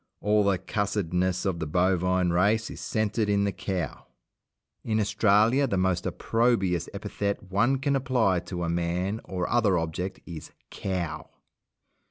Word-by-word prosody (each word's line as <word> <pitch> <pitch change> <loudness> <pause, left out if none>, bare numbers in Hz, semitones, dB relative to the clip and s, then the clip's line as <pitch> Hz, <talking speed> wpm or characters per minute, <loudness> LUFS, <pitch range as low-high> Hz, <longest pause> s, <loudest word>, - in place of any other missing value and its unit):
All 105 0 +2
the 100 -2 +2
cussedness 95 -2 -1
of 95 -4 -1
the 80 - -3
bovine 90 +1 +2
race 105 +6 +2
is - - -8
centred 110 0 -1
in 100 0 +2
the 100 - +1
cow. 95 -3 -4 0.8
In 110 -1 0
Australia 110 +5 +3
the 100 - -1
most 95 -1 +1
opprobious 95 -8 +1
epithet 100 -1 -4
one 115 +8 +3
can 140 +1 0
apply 125 -8 +2
to 90 0 -5
a - - -1
man 85 +5 -1
or 90 -2 -3
other 110 -6 +2
object 85 +3 -3
is 80 -3 -8 0.2
"cow". 90 -5 -4
95 Hz, 145 wpm, -27 LUFS, 90-105 Hz, 0.8 s, Australia